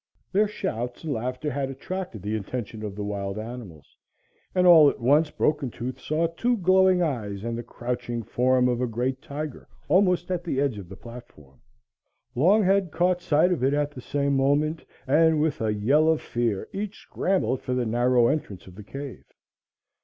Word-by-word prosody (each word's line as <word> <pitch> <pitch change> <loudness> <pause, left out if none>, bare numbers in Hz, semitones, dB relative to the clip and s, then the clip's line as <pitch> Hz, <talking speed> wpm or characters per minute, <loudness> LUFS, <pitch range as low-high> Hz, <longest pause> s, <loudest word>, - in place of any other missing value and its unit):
Their 210 +2 +3
shouts 120 - -4
and 155 -3 -2
laughter 125 +5 -3
had 135 0 -2
attracted 135 - -6
the 105 +2 -2
attention 110 +1 -5
of 105 -2 -5
the 105 - -4
wild 100 -1 -4
animals, 110 - -9 0.6
and 180 -1 +3
all 160 -5 +8
at - - -6
once 145 +6 +3
Broken 150 -3 0
Tooth 125 +3 -6
saw 155 +2 0
two 235 +9 0
glowing 185 -1 +4
eyes 105 - -3
and 115 0 -3
the 120 - -4
crouching 120 -1 -4
form 125 +2 +2
of 125 0 0
a 125 - +1
great 125 +3 -2
tiger 150 -1 -6 0.2
almost 180 +1 +2
at 175 -1 -1
the 160 -6 -2
edge 135 -7 0
of 95 - -10
the 95 - -9
platform. 75 - -13 0.7
Longhead 190 - +3
caught 180 +3 +1
sight 170 +1 +3
of 170 -8 -1
it 135 +2 +3
at 145 0 0
the 130 - -9
same 140 +1 0
moment, 145 +4 +1 0.2
and 155 +3 +4
with 150 -4 0
a 110 -1 +1
yell 135 +10 +3
of 160 -1 +3
fear 115 -5 -2
each 205 +1 -4
scrambled 185 -8 -1
for 125 - -2
the 125 -1 0
narrow 120 +2 +3
entrance 115 - -2
of 95 - -13
the 105 +3 -11
cave. 135 +5 -8
135 Hz, 185 wpm, -25 LUFS, 115-160 Hz, 0.7 s, all